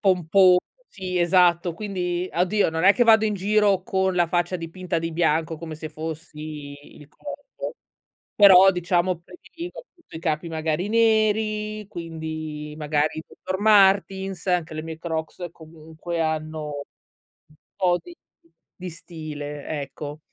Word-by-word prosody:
pomposo, 185 -1 +5 0.3
sì, 185 -2 -4
esatto. 175 0 +3
Quindi, 180 -2 -3
oddio, 180 +1 +2
non 160 +2 -1
è 200 - +8
che 245 - +3
vado 220 -1 +6
in 210 -1 0
giro 200 -1 +2
con 190 -3 0
la 175 -1 +3
faccia 175 +1 0
dipinta 170 +1 -4
di 165 0 -4
bianco 160 -1 +1
come 160 -1 -7
se 155 +1 -7
fossi 155 -2 -7 0.2
Il 150 - -14
Corvo, 295 - -8 0.6
però, 195 -2 +8
diciamo, 180 0 0
prediligo, 345 - -10
appunto, 345 - -17
i - - -5
capi, 155 0 -1
magari, 160 +3 -2
neri. 215 -1 +1
Quindi, 160 -3 -6
magari, 150 +1 0
le - - -17
Dr. 185 +1 -2
Martens, 195 -3 +3
anche 175 -3 0
le 155 - -4
mie 160 0 -7
Crocs, 160 +1 -4
comunque, 160 +1 -8
hanno 155 -1 -2 0.8
un 155 - -23 0.2
po' 180 -3 +2
di 350 - -12 0.6
di 180 -1 -6
stile, 150 -3 -8 0.2
ecco. 145 +2 -7
175 Hz, 140 wpm, -24 LUFS, 160-195 Hz, 0.8 s, è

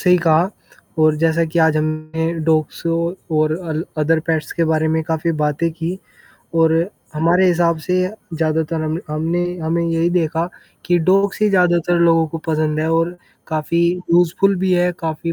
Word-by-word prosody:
सही 180 -1 +4
कहा 170 +1 +3 0.5
और 155 -1 +4
जैसा 165 +1 +2
कि 160 +1 -2
आज 160 -1 +4
हमने 155 +1 -2
डॉग्स 155 0 0
ओ 170 0 0 0.3
और 155 0 +2 0.2
अल 160 +1 -2
अदर 160 +1 +2
पेट्स 160 -2 -1
के 165 - 0
बारे 160 0 +1
में 160 0 0
काफ़ी 160 +1 -1
बातें 150 +3 0
की 170 +3 -4 0.6
और 160 -1 +4 0.4
हमारे 170 +4 +3
हिसाब 170 -1 +2
से 180 0 +1 0.4
ज़्यादातर 160 0 -1
हम 155 +1 -2
हमने 165 +3 -1 0.2
हमें 165 +1 -1
यही 165 +1 +1
देखा, 165 -1 0 0.4
कि 175 0 +2
डॉग्स 195 +4 +2
ही 210 - +4
ज़्यादातर 175 -2 +2
लोगों 165 -1 +4
को 165 - -5
पसंद 155 -1 0
है 160 +1 0
और 165 +2 0 0.3
काफ़ी 160 +1 -1 0.3
यूज़फुल 180 +3 +3
भी 190 -1 +1
है, 180 0 +2
काफ़ी 165 0 -3
165 Hz, 170 wpm, -19 LUFS, 155-170 Hz, 0.6 s, सही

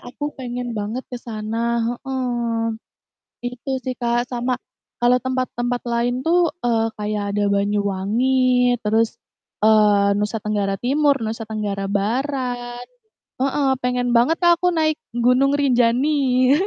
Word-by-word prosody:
aku 290 +4 -6
pengen 245 -1 -4
banget 215 +5 -3
ke - - -2
sana," 230 +1 -2 0.2
heeh, 240 -4 -1 0.7
itu 250 +2 -6
sih, 255 - -2
Kak, 240 0 0
sama 245 0 -1 0.5
kalau 245 +1 +5
tempat-tempat 250 -1 -2
lain 240 +2 0
tuh, 345 0 +3
eee, 225 -2 +2
kayak 210 0 -2
ada 205 - +2
Banyuwangi, 215 +6 +2
terus, 225 +2 +1 0.5
eee, 210 -2 +4
Nusa 210 +2 -1
Tenggara 205 -2 -1
Timur, 285 +3 +3
Nusa 225 +1 -3
Tenggara 205 -2 -3
Barat. 245 +3 -2 0.5
Heeh, 275 0 +1
pengen 250 0 0
banget 250 +8 +4
Kak, 345 -1 +5
aku 360 - +3
naik 310 -1 +1 0.2
Gunung 250 +3 +3
Rinjani. 255 0 +3
245 Hz, 120 wpm, -21 LUFS, 220-260 Hz, 0.7 s, kalau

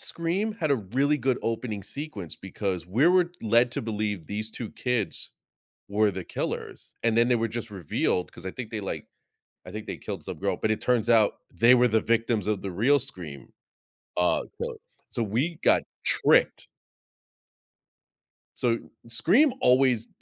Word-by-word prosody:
Scream 180 +6 -1
had 170 -8 -2
a 140 - +4
really 135 +9 +1
good 130 -1 0
opening 115 -3 -2
sequence 110 - -6
because 95 -3 -4
we 120 - +3
were 180 -1 +4
led 115 +2 +4
to - - -2
believe 105 -6 -2
these 110 +2 -2
2 115 -1 -6
kids 125 -5 -1 0.6
were 105 +1 +3
the 95 -2 -6
killers, - - -5
and, 115 -1 +2
then, 120 +1 +4
they 125 - +4
were 115 0 0
just 115 0 -5
revealed 90 -1 -1
'cause - - -11
I 95 - -2
think 120 -4 -7
they, 110 - -3
like 95 - -5 0.6
I - - -8
think 110 0 -6
they - - -4
killed - - -6
some - - -6
girl, - - 0
but 110 - -1
it 110 - 0
turns 120 -2 +1
out 110 -3 +5 0.2
they 120 +2 +6
were 125 0 +5
the 110 -1 +3
victims 115 -3 +1
of 105 -2 -1
the 100 - -3
real 130 +10 +4
Scream, 80 - -8 0.6
uh, 90 0 +2 0.2
so - - -3 0.3
so 120 - -2
we 130 - -1
got - - +4 0.2
tricked. - - +3 1.9
So, 115 -2 +1 0.3
Scream 205 - +3
always 125 - +4
115 Hz, 170 wpm, -27 LUFS, 105-125 Hz, 1.9 s, they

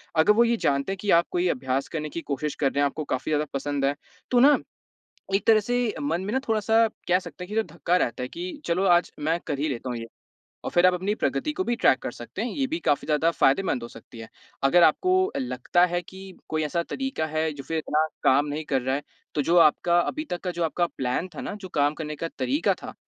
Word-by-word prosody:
अगर 160 +6 +5
वो 235 +2 +5
ये 235 0 +2
जानते 140 +1 0
हैं 195 - -3
कि 205 - -3
आप 170 - +2
कोई 180 0 +1
अभ्यास 130 0 -1
करने 155 -2 -4
की 170 - -5
कोशिश 145 0 -3
कर 135 -2 +1
रहे 140 - -2
हैं - - +4
आपको 155 +2 -2
काफ़ी 130 +4 -2
ज़्यादा 150 0 +1
पसंद 140 0 -1
है 140 +1 +1 0.4
तो 245 - +4
ना 285 +4 +7 0.8
एक 195 - +1
तरह 220 -1 +6
से 245 0 -1
मन 285 -11 0
में 205 - -3
ना - - +3
थोड़ा-सा 225 +1 +3 0.2
कह 180 +1 +4
सकता 175 -1 -10
है - - -10
कि 210 - -6
जो 225 - +3
धक्का 175 0 -1
रहता 125 -7 -1
है 125 - -3
कि 180 - -7
चलो 180 +3 0
आज 175 -1 +3
मैं 160 +3 0
कर 140 - -2
ही 150 +2 0
लेता 130 -1 -4
हूँ 120 - -3
ये 115 - -6 0.6
और - - -3
फ़िर 175 +1 +4
आप 180 - +4
अपनी 190 +4 -1
प्रगति 300 +6 -1
को 375 +5 -2
भी 240 - 0
ट्रैक 130 - +4
कर - - -4
सकते 120 - -7
हैं, 245 - -1
ये 275 -2 -1
भी 320 +5 -3
काफ़ी 145 - +1
ज़्यादा 155 +2 +2
फ़ायदेमंद 135 -4 +2
हो 120 - -6
सकती 120 - -14
है। 115 - -9 0.4
अगर 170 +6 +5
आपको 370 - +3
लगता 130 +7 +1
है 175 0 -1
कि 190 +1 -11
कोई 155 0 -1
ऐसा 170 +3 -1
तरीका 265 -7 -3
है 155 +1 -1
जो 140 -2 -8
फ़िर 160 +4 -2
इतना 155 0 +1 0.2
काम 140 +3 +4
नहीं 150 +2 -4
कर 135 -4 0
रहा 130 +1 0
है, 145 - -2 0.3
तो 145 - +1
जो 170 +5 +2
आपका 170 +2 +4
अभी 305 - -2
तक 175 - -3
का 180 - -1
जो 175 -1 -2
आपका 175 +2 +1
प्लान 130 +7 -1
था - - -6
ना, - - -5
जो 195 -3 -9
काम 145 -2 +1
करने 150 -1 -5
का 165 - -4
तरीका 285 +5 +1
था, - - -8
165 Hz, 255 wpm, -25 LUFS, 145-195 Hz, 0.8 s, ना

